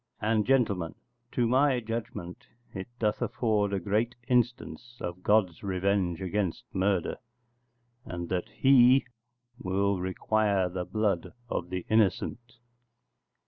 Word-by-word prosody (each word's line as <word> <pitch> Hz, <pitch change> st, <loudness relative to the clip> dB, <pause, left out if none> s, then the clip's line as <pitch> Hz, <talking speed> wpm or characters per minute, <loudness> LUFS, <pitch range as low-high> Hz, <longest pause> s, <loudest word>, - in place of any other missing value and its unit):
And, 110 Hz, 0 st, +1 dB
gentlemen, 105 Hz, -11 st, +1 dB, 0.4 s
to 120 Hz, -, +2 dB
my 130 Hz, +1 st, +3 dB
judgement 110 Hz, -6 st, -6 dB, 0.3 s
it 95 Hz, 0 st, -6 dB
doth 105 Hz, -3 st, 0 dB
afford 105 Hz, -4 st, 0 dB
a 100 Hz, -, 0 dB
great 110 Hz, +6 st, 0 dB
instance 120 Hz, -2 st, -1 dB
of 90 Hz, +1 st, -5 dB
God's 95 Hz, -5 st, +2 dB
revenge 95 Hz, -2 st, 0 dB
against 95 Hz, -1 st, -1 dB
murder, 95 Hz, -2 st, 0 dB, 0.9 s
and 85 Hz, -1 st, -5 dB
that 90 Hz, -1 st, -2 dB
He 130 Hz, 0 st, +5 dB, 0.5 s
will 100 Hz, +1 st, 0 dB
require 95 Hz, +1 st, +1 dB
the 90 Hz, 0 st, -4 dB
blood 105 Hz, -5 st, -1 dB, 0.2 s
of 90 Hz, -, -2 dB
the 90 Hz, -1 st, -4 dB
innocent. 110 Hz, +3 st, 0 dB
100 Hz, 115 wpm, -29 LUFS, 90-115 Hz, 0.9 s, He